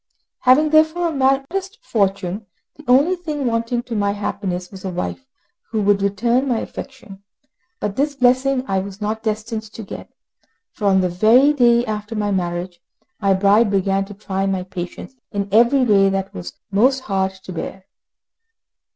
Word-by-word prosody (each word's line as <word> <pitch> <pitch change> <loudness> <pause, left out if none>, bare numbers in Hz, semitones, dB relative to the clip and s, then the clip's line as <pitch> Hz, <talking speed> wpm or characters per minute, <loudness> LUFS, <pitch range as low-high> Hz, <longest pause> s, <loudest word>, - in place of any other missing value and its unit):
Having 295 +4 +4
therefore 315 +2 +3
a - - -3
modest 280 - 0
fortune, 200 - -1 0.3
the 300 - -14
only 280 +9 +4
thing 305 -6 -4
wanting 230 +1 -1
to 235 - -6
my 200 -1 +1
happiness 190 -3 -4
was 190 -2 -11
a 190 - -3
wife 185 +9 -5 0.4
who 215 -3 -1
could 200 -1 +3
return 235 +7 +1
my 245 -3 +1
affection, 230 -6 -8 0.6
but 205 -1 -3
this 285 +3 0
blessing 260 +1 +2
I 195 -1 +1
was 195 +1 -7
not 215 +1 -2
destined 215 +1 -3
to 220 +1 -10
get; 195 - -9 0.6
for 210 - -6
on 190 -1 +4
the 180 - +1
very 230 +11 +5
day 240 -3 +4
after 215 0 -4
my 205 -1 -1
marriage, 175 -1 -3 0.4
my 195 -2 +3
bride 205 +3 +4
began 195 0 +1
to 205 +1 -11
try 195 -1 -2
my 190 -1 -1
patience 180 +6 -7 0.2
in 200 -1 -2
every 240 +5 +5
way 195 -3 +4
that 195 0 -2
was 90 -1 -7 0.2
most 255 +7 +3
hard 190 -4 -1
to 190 -1 -10
bear. 185 +3 -6
210 Hz, 170 wpm, -20 LUFS, 195-255 Hz, 0.6 s, very